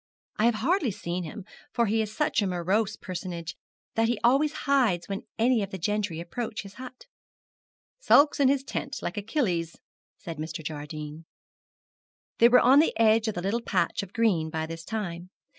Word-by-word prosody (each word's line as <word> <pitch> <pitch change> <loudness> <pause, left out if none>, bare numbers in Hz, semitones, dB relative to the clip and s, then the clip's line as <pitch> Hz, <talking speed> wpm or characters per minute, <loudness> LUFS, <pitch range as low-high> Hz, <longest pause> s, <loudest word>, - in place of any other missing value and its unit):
I 215 - +2
have 235 -1 +4
hardly 285 - +1
seen 180 -3 -4
him, 185 +5 -8 0.3
for 235 - +2
he 220 +1 +1
is 215 -1 -3
such 295 -1 +1
a 200 - 0
morose 190 +4 0
personage 175 -4 -6 0.4
that 225 0 +2
he 235 -2 0
always 275 +5 +4
hides 250 - +2
when 200 +4 -5
any 235 0 +3
of 200 - -3
the 190 - -6
gentry 205 -2 -1
approach 215 +6 -5
his 195 -1 -11
hut.' 255 0 -10 0.9
'Sulks 295 -11 +5
in 280 - +5
his 270 0 +2
tent, 275 0 -5
like 175 - -4
Achilles,' 200 - -1 0.4
said 165 -5 -8
Mr. 155 0 -5
Jardine. 150 +1 -6 1.1
They 235 - +7
were 250 - +6
on 265 +4 +6
the 315 - +2
edge 225 0 +4
of 220 - -2
the 175 - -4
little 215 +5 0
patch - - 0
of 195 -2 -9
green 195 -9 +1
by 160 0 -2
this 165 +1 -7
time. 180 -4 -5
210 Hz, 180 wpm, -27 LUFS, 170-235 Hz, 1.1 s, They